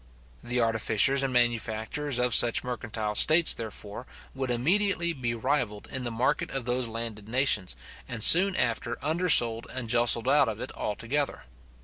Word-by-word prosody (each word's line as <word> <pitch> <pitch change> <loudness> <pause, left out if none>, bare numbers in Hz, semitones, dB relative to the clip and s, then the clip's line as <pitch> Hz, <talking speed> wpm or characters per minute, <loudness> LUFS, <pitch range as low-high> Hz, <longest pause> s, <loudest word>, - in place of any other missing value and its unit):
The 120 +1 -3
artificers 115 +4 +1
and 135 -1 -3
manufacturers 120 +3 -2
of 125 0 0
such 120 -1 +4
mercantile 110 -4 -6
states, 160 +9 +4
therefore, 110 +1 -9 0.3
would 130 -1 -5
immediately 170 - 0
be 120 -5 -5
rivalled 120 -4 -4
in 130 -1 -5
the - - -2
market 125 +6 -2
of 135 -3 -4
those 125 0 -2
landed 110 -2 -8
nations, 120 - 0 0.3
and 120 -3 -4
soon 185 +7 +8
after 120 -7 -2
undersold 145 -8 +4
and 130 -2 -6
justled 120 0 +2
out 140 -2 +2
of 110 -1 -7
it - - -7
altogether. 130 +7 -4
120 Hz, 150 wpm, -26 LUFS, 115-135 Hz, 0.3 s, soon